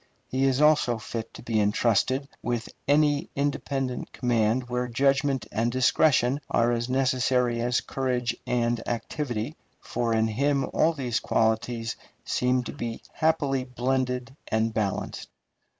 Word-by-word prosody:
He 130 +1 +1
is 135 +1 +2
also 150 -6 +4
fit 115 +1 -6
to - - -10
be 110 -2 0
intrusted 115 +6 +2
with 120 -1 -2 0.2
any 145 0 +3
independent 140 -2 -2
command 120 0 +1
where 125 0 -1
judgment 135 0 +1
and 115 +3 0
discretion 130 +1 +3
are 120 +1 +3
as 120 +1 -1
necessary 125 -2 +1
as 120 +1 +1
courage 125 -3 -1
and 120 -1 +1
activity, 120 +2 -3 0.2
for 120 -1 -2
in 110 0 +2
him 140 +5 +1
all 165 +1 +3
these 125 -6 -1
qualities 115 +1 0 0.3
seem 125 0 +1
to - - -6
be 115 -1 -5
happily 145 -5 +1
blended 125 +1 -2
and 110 0 0
balanced. 105 -3 -2
125 Hz, 135 wpm, -26 LUFS, 115-135 Hz, 0.3 s, also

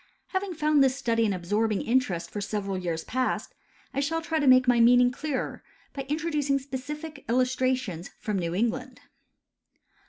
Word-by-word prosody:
Having 375 -2 -2
found 305 -2 +3
this 260 -1 +3
study 230 -3 +1
an - - 0
absorbing 205 +4 0
interest 200 -9 0
for 205 - -4
several 200 -1 -2
years 170 -3 -3
past, 255 0 -2 0.4
I 275 - -1
shall 320 +4 0
try 325 -1 -1
to 290 - +1
make 255 0 +6
my 245 -1 +4
meaning 245 +1 +6
clearer 285 +1 -3 0.3
by 275 -1 -5
introducing 300 -2 0
specific 285 +3 -6
illustrations 255 -7 0
from 210 -4 -2
New 170 -1 -2
England. 240 +4 -2
255 Hz, 155 wpm, -27 LUFS, 210-285 Hz, 0.4 s, make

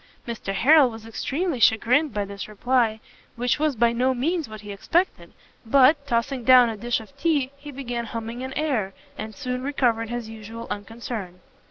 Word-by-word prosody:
Mr 230 -4 -4
Harrel 280 +5 +6
was 225 -1 -10
extremely 280 +6 -2
chagrined 250 +7 +4
by 205 -1 -2
this 200 0 -7
reply, 225 +1 +1 0.4
which 245 +3 0
was 305 -2 +1
by 235 +1 +3
no 255 +2 +1
means 315 +3 -1
what 215 -1 -9
he 205 -1 -8
expected; 335 - -1 0.3
but, 280 +4 +4
tossing 245 +1 -1
down 250 -1 +7
a 225 - -4
dish 240 +3 -1
of 225 +5 -14
tea, 285 -5 +1
he 285 +1 -11
began 245 -3 -4
humming 230 +2 -5
an 260 0 -5
air, 245 -11 -1 0.2
and 215 0 -7
soon 250 -3 -3
recovered 245 -5 0
his 240 -1 -4
usual 225 +1 -8
unconcern. 205 -3 -6
240 Hz, 175 wpm, -24 LUFS, 220-275 Hz, 0.4 s, down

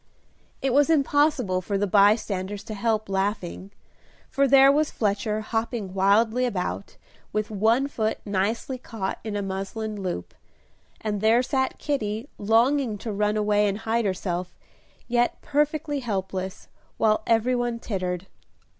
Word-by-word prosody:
It 270 -2 +1
was 290 +3 +4
impossible 285 - +2
for 200 +2 -2
the 205 - +1
bystanders 200 -1 +2
to 215 - -7
help 215 +1 0
laughing, 195 -1 -2 0.6
for 275 0 +3
there 270 +1 +7
was 300 +1 +2
Fletcher 210 0 -1
hopping 225 -3 -3
wildly 220 +6 +3
about, 195 -3 -3 0.3
with 215 0 -2
one 225 +6 +2
foot 220 -6 -1
nicely 210 +6 -1
caught 220 -6 -4
in 215 -2 -4
a 205 - -1
muslin 195 +2 -4
loop, 180 - -4 0.7
and 210 -2 -2
there 225 +3 +4
sat 265 0 -1
Kitty 225 -4 -2
longing 230 +2 +2
to 220 +2 -5
run 210 +1 +1
away 210 0 +2
and 200 0 -1
hide 225 +1 -1
herself, 180 -2 -3 0.5
yet 240 0 +1
perfectly 295 0 0
helpless, 190 -4 -4 0.3
while 215 -1 +3
every 230 +2 +3
one 240 -1 -1
tittered. 185 -5 -3
215 Hz, 135 wpm, -25 LUFS, 200-245 Hz, 0.7 s, there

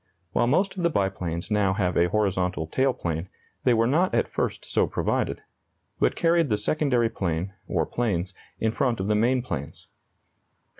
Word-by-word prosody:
While 120 - +2
most 190 +10 +2
of 185 - -4
the 170 - +3
biplanes 95 - -2
now 100 -2 +2
have 90 -2 0
a 85 +1 +3
horizontal 90 -5 0
tail 130 +11 +1
plane, 85 -5 -4 0.4
they 125 - +5
were 115 0 +3
not 160 +9 +2
at - - +2
first - - -3
so - - +1
provided, - - -1 0.6
but - - +2
carried 165 -3 +3
the 105 - +2
secondary 125 +1 +1
plane 90 +1 -2
(or - - 0
planes) 100 -6 -1 0.3
in 110 - +1
front 120 -1 0
of 95 - -1
the 105 - +2
main 120 +4 +2
planes. 80 - -6
105 Hz, 170 wpm, -26 LUFS, 90-125 Hz, 0.6 s, they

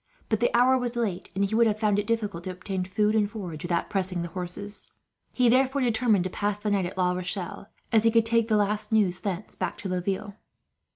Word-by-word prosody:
But 220 - +1
the 240 - +3
hour 255 +2 +5
was 245 -1 -3
late, 215 -7 -2
and 200 +1 +2
he 200 - -4
would 230 +1 +5
have 210 -1 +1
found 210 -2 +2
it 205 - -3
difficult 210 -7 -2
to - - -3
obtain 185 0 -4
food 210 +3 +1
and 210 -2 +2
forage, 180 -8 -6
without 175 -1 -1
pressing 185 -3 0
the 170 - -5
horses. 185 +4 -4 0.4
He 250 -1 +2
therefore 265 +3 +3
determined 225 -5 +2
to 185 - -2
pass 205 +1 -1
the 210 0 -2
night 195 -3 +1
at 185 - -9
La 180 -1 +2
Rochelle, 180 +2 -4 0.2
as 220 -1 +4
he 230 - +5
could 225 0 +3
take 230 0 +2
the 215 -2 +3
last 210 +1 0
news, 195 -5 +2
thence, 195 0 -4
back - - -3
to 195 - -5
Laville. 190 +3 -2
205 Hz, 230 wpm, -27 LUFS, 185-225 Hz, 0.4 s, hour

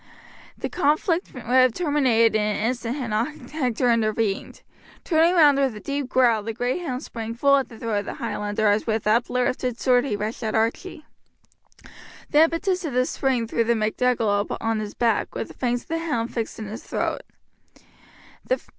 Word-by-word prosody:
The - - -3
conflict 330 +3 0
would 250 - -9
have 255 0 +4
terminated 260 -9 +3
in 215 - +3
an 210 0 0
instant 245 -1 -3
had 255 -6 -4
not 245 +5 -3
Hector 250 -5 +1
intervened. 215 -3 -1 0.4
Turning 335 +1 +3
round 295 -5 +6
with 265 -5 +1
a - - -7
deep 280 +2 -3
growl 240 -4 +3
the 225 +2 -4
great 245 +9 -2
hound 265 -5 -4
sprang 230 -1 -6
full 280 +3 +4
at 270 - -2
the 225 - -12
throat 220 -2 -1
of 205 - -6
the - - -5
Highlander 210 +1 -2
as 205 +2 +2
with 220 -1 -1
uplifted 245 +2 0
sword 250 0 +3
he 240 - -1
rushed 210 +2 -4
at 220 -1 -2
Archie. 295 +9 -2 1.3
The 310 +1 +7
impetus 365 +3 -1
of 305 -6 -4
the 255 +1 +2
spring 260 -3 0
threw 230 +1 0
the 235 +1 +1
MacDougall 220 -2 +1
on 225 -1 -1
his 210 -1 -6
back, 230 -3 0
with - - -4
the - - -11
fangs 245 -1 -1
of - - -32
the 330 0 -1
hound 245 -9 -2
fixed 230 -2 -3
in 220 - -6
his 215 +3 -7
throat. - - -2
245 Hz, 185 wpm, -24 LUFS, 220-280 Hz, 1.3 s, The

